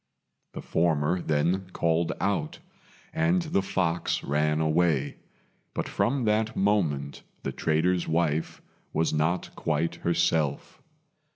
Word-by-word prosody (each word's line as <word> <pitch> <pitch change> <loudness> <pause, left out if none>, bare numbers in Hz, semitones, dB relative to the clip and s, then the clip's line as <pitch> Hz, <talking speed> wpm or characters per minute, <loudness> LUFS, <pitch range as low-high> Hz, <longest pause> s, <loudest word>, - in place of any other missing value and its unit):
The - - -6
former 80 +1 +1
then 85 +5 0
called 85 0 +1
out, 100 - -1 0.6
and 170 +3 +2
the 155 -11 0
fox 90 -3 -1
ran 75 +2 +1
away; 80 -3 +1 0.6
but - - -2
from 130 0 0
that 110 +1 +1
moment 80 -9 0 0.2
the - - -2
trader's 85 +3 +1
wife 80 -1 0 0.3
was 80 +1 +1
not 80 +4 0
quite 80 +1 0
herself. 85 -4 0
85 Hz, 110 wpm, -27 LUFS, 75-95 Hz, 0.6 s, and